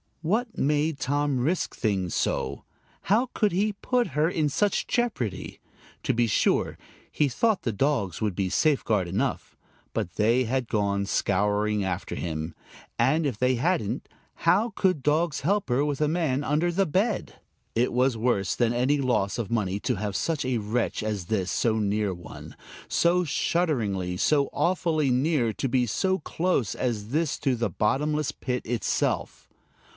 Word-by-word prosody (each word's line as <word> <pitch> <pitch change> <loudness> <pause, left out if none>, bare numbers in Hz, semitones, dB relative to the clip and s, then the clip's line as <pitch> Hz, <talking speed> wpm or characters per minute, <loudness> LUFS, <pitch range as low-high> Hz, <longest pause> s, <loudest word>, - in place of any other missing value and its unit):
What 215 +10 0
made 150 +1 +1
Tom 140 +1 0
risk 160 +9 0
things 95 -5 -1
so! - - -1 0.4
How 230 +6 +2
could 210 -3 +2
he 205 +4 +1
put 245 +2 0
her 150 +2 +1
in 155 -4 0
such 205 +7 +1
jeopardy? 220 - -2 0.4
To - - +1
be 120 0 +2
sure, 105 - +1 0.3
he 150 - +2
thought 215 - +1
the 115 - 0
dogs 105 - 0
would 105 -4 0
be 95 -1 -1
safeguard 110 - +1
enough, 115 +10 -2 0.4
but 85 - -2
they 115 +4 +3
had 125 +1 -1
gone 100 -2 0
scouring 105 +2 +1
after 95 0 -3
him. 80 -1 -4 0.5
And 145 +7 +3
if 125 -7 -3
they 125 +2 +2
hadn't, 155 - -1 0.3
how 225 +3 +2
could 185 -7 +1
dogs 150 +2 +1
help 200 +4 0
her 125 +4 +2
with 145 -1 -2
a 150 - +3
man 150 -4 0
under 155 +4 +1
the 195 +3 +2
bed? 200 +7 0 0.4
It 120 +2 +2
was 125 0 +2
worse 110 -6 +1
than 120 -1 +2
any 130 +4 +2
loss 120 -7 0
of 115 -4 -4
money 100 -4 0
to 125 - 0
have 100 0 -3
such 160 -5 -1
a 125 -2 0
wretch 110 +3 -1
as 105 -4 -3
this 95 -1 -1
so 110 -2 +1
near 105 -1 0
one, 85 -1 -10 0.3
so 175 +1 +2
shudderingly, 115 - 0
so 140 +6 +2
awfully 165 -5 +1
near, 130 -2 +2
to 135 - -2
be 125 0 +2
so 190 - 0
close 160 - 0
as 110 -4 -2
this 155 +3 0
to 135 -3 +1
the 115 -2 -1
bottomless 150 - 0
pit 125 -1 -3
itself! 120 -1 -1
130 Hz, 160 wpm, -26 LUFS, 105-155 Hz, 0.5 s, they